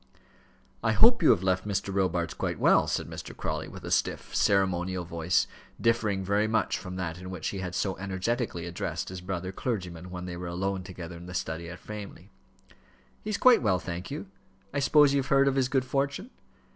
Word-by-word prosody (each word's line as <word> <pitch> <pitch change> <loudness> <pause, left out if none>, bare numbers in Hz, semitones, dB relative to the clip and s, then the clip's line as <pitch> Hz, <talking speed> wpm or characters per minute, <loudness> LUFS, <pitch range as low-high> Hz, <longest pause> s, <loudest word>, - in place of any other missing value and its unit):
"I 110 -1 +3
hope 235 - +6
you 160 - +6
have 90 - +5
left 95 +1 +1
Mr. 100 -1 -1
Robarts 90 -3 0
quite - - -2
well," - - +4
said - - -1
Mr. - - -8
Crawley, - - -3
with - - -10
a - - -5
stiff, - - 0
ceremonial 95 -2 +2
voice, 85 0 +1 0.3
differing 110 -4 +1
very 100 +3 +2
much 110 +1 +1
from 90 -1 -7
that 85 -2 -3
in 90 0 -8
which 90 -4 -3
he 100 - -4
had 90 -1 -4
so 95 0 0
energetically 95 0 -2
addressed 85 0 -3
his 90 -1 -6
brother 90 0 -3
clergyman 90 -6 -4
when 90 0 -6
they 90 -1 -5
were 90 0 -5
alone 95 +2 -2
together 90 -2 -8
in 85 +1 -10
the 90 - -7
study 85 0 -3
at 90 - -7
Framley. 105 +1 -9 0.9
"He 215 - -4
is 210 - 0
quite 255 +1 +6
well, 100 -6 +3
thank 85 +2 -5
you. 95 - -5 0.5
I 140 - 0
suppose 145 0 +5
you 140 - +3
have 130 - -2
heard 135 0 +4
of 135 - +3
his 130 -1 +1
good 130 -2 +1
fortune?" 140 - -1
95 Hz, 205 wpm, -28 LUFS, 90-115 Hz, 0.9 s, hope